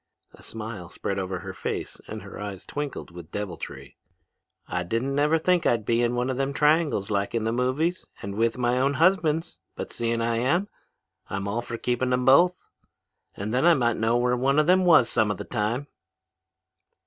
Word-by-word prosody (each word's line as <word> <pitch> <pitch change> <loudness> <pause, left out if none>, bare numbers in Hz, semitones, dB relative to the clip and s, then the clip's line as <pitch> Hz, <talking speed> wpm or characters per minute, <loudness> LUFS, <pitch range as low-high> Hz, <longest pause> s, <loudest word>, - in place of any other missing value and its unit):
A - - -16
smile 105 -5 -7
spread 100 +1 -3
over 95 -1 -3
her 95 0 -7
face - - -5
and - - -7
her - - -10
eyes 100 -2 -6
twinkled 145 -10 -5
with 85 -1 -11
deviltry. 95 -5 -6 0.7
'I 90 - -2
didn't 115 +8 -1
never 150 +3 +3
think 175 +1 +2
I'd 115 -3 +1
be 115 +2 +2
in 120 0 +1
one 125 +2 0
of 130 - -3
them 135 +1 -1
triangles 150 - +2
like 100 +2 -1
in 115 - 0
the 110 - 0
movies, 130 +9 0
and 100 - -6
with 115 +3 +1
my 125 0 +1
own 140 +2 +2
husbands, 165 -1 +2 0.2
but - - -6
seein' 115 0 -1
I 115 0 0
am, 170 - +1 0.6
I'm 100 +1 -3
all 110 +4 -1
for 120 -1 -6
keeping 125 +2 -1
them 125 0 +1
both. 175 +7 +4 0.7
Then 110 +7 -1
I 170 0 +6
might 120 -3 +1
know 115 +2 +2
where 125 0 +2
one 135 +3 +1
of 155 - +4
them 185 +2 +4
was 160 -9 +6
some 110 -3 +2
of 105 - -2
the - - -5
time.' 115 +7 -1
120 Hz, 195 wpm, -26 LUFS, 105-145 Hz, 0.7 s, I